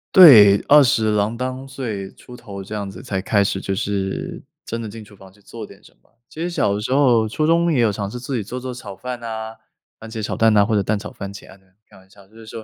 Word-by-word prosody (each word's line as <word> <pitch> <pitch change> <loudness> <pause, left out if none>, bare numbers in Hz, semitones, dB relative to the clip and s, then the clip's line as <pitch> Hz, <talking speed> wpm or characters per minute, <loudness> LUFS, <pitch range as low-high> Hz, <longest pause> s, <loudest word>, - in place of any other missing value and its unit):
对， 110 - +9
20 120 -7 +5
郎 105 +3 0
当 130 +1 -5
岁 110 -8 -6
出 125 - -14
头 100 -4 -9
这 105 - -9
样 100 -2 -4
子， 90 -1 -11
才 95 -2 -3
开 100 0 +2
始 95 0 -2
就 95 - -3
是 105 - -3 0.2
真 115 +1 -5
的 110 - -5
进 110 +1 -10
厨 105 -1 -17
房 95 -1 -16
去 105 +1 -25
做 110 +1 -9
点 - - -17
什 - - -19
么。 - - -33 0.2
其 160 - -9
实 175 - -2
小 100 - 0
的 105 - -3
时 125 +4 -2
候， 120 -6 +3
初 155 +8 -1
中 170 +1 +2
也 135 - +1
有 110 -3 +3
尝 100 0 -4
试 125 - -7
自 130 +2 -5
己 110 - -2
做 125 +5 -6
做 130 0 -6
炒 105 -6 -9
饭 125 +4 -6
哪， 110 -1 -6 0.4
番 115 - -10
茄 110 -1 -6
炒 - - -3
蛋 110 -1 +3
哪， 100 -1 +4
或 110 -1 0
者 100 - +2
蛋 105 +2 -1
炒 105 +1 -8
番 100 -1 -8
茄 100 - -11
啊 95 - -15
这 95 - -30
样， 95 0 -34
开 - - -18
玩 95 0 -21
笑， 100 -1 -19
就 110 - -25
是 115 -1 -13
说 110 0 -9
110 Hz, 300 characters per minute, -20 LUFS, 100-125 Hz, 0.4 s, 对